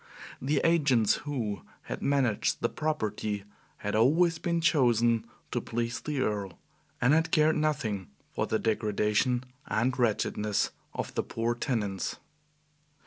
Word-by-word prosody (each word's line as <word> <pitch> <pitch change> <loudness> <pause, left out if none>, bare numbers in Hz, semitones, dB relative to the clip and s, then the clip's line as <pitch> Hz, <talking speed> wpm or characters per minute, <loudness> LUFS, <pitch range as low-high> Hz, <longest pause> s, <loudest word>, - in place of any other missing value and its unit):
The 140 +2 +1
agents 140 -10 +4
who 110 -8 -2 0.2
had - - -5
managed 135 -6 +1
the - - +2
property 110 -9 -2 0.3
had 105 +1 -3
always 160 +9 +4
been 170 -1 0
chosen 120 -8 +3 0.2
to - - 0
please 120 +1 -2
the 150 -3 -2
Earl, 100 -6 -2 0.4
and 125 +4 +4
had 160 +1 +3
cared 155 0 +4
nothing 135 - -1 0.3
for - - -1
the 110 - +1
degradation 110 +3 +1 0.2
and 120 +4 +1
wretchedness 105 -2 +1 0.2
of - - -4
the - - +1
poor 115 +1 -1
tenants. 105 -6 -2
120 Hz, 130 wpm, -29 LUFS, 105-150 Hz, 0.4 s, agents